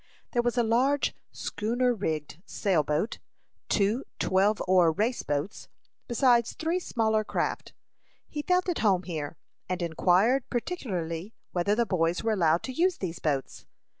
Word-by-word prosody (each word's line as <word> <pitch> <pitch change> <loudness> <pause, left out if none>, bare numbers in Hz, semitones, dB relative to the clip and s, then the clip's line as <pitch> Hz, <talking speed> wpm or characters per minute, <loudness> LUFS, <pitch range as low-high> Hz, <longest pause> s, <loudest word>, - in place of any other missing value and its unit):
There 240 - +2
was 240 +1 -1
a 240 - +4
large 260 +5 +2 0.2
schooner 245 +4 0
rigged 160 -6 -3
sail 185 -6 +1
boat, 150 +8 -1 0.5
two 215 +5 +2
twelve 200 +3 +2
oar 180 -3 +5
race 220 +9 0
boats, 145 +7 -3 0.4
besides 240 -1 +3
three 330 +3 -1
smaller 220 -9 +1
craft. - - -2 0.5
He 300 - -4
felt 360 +3 +1
at 355 - -1
home 190 -4 +3
here, 160 -3 -5 0.3
and 185 0 -1
inquired 185 - +2
particularly 195 - -3 0.2
whether 185 +4 +1
the 235 +1 +2
boys 175 -2 0
were 225 - +1
allowed 170 -4 +2
to 260 - -4
use 355 +6 +2
these 175 -3 -4
boats. 140 -4 -2
210 Hz, 145 wpm, -28 LUFS, 170-245 Hz, 0.5 s, oar